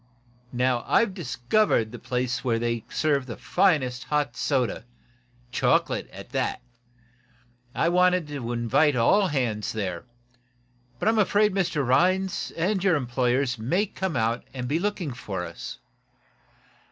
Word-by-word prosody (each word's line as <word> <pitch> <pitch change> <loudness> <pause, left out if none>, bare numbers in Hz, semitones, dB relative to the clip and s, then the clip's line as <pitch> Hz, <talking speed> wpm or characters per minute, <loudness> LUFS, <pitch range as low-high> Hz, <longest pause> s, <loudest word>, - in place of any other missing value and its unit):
Now, 125 -1 +1
I've 225 -4 +3
discovered 125 - +1
the 120 - -8
place 125 +2 -2
where 120 -3 +1
they 115 -1 -2
serve 140 -1 0
the 115 - -6
finest 130 -10 +1
hot 145 -5 -1
soda 130 -5 0 0.7
chocolate, - - +1
at - - -11
that. - - -2 1.1
I - - +2
wanted 180 -1 +3
to 130 -5 -4
invite 120 +5 +2
all 190 - +4
hands 120 - -1
there. 95 -3 -4 0.9
But 135 - -2
I'm 220 0 +3
afraid 205 0 +3 0.2
Rhinds 180 +8 +2
and 185 +3 0
your 190 -4 +4
employers 125 -1 0
may 175 - +1
come 190 -3 -4
out 115 +2 0
and 125 -1 -4
be 150 +5 0
looking 185 -7 -2
for 95 -7 -5
us. 85 0 -8
130 Hz, 130 wpm, -26 LUFS, 120-180 Hz, 1.1 s, all